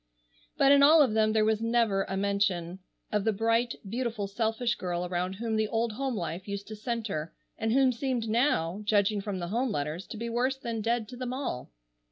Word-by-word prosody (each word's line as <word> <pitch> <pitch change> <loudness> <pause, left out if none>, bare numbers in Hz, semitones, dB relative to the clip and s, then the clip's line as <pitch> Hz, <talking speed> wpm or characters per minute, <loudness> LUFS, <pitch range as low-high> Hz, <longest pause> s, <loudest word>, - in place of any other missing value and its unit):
But 275 - +5
in 280 0 +7
all 300 +2 +8
of 250 -6 0
them 215 0 +3
there 215 0 +3
was 220 0 +1
never 230 -4 +2
a 195 - -3
mention 195 -3 0 0.3
of 210 -1 +1
the 220 - +2
bright, 230 +3 +1
beautiful, 230 -1 -2
selfish 225 +4 0
girl 180 -3 -3
around 180 +1 -2
whom 220 +3 -2
the 215 0 +1
old 230 +1 0
home 260 +3 -2
life 180 0 -4
used 200 0 -5
to 215 - -6
centre 210 -8 -3 0.2
and 225 0 -1
who 265 +1 +4
seemed 250 -2 -2
now, 215 - +1
judging 205 0 +2
from 195 -1 -4
the 175 -1 -4
home 245 +5 0
letters, 155 +2 -3
to - - -7
be 230 +2 -4
worse 250 +3 0
than 230 -4 -4
dead 230 0 0
to 250 - -8
them 250 0 -4
all. 260 - -4
220 Hz, 210 wpm, -29 LUFS, 195-235 Hz, 0.3 s, all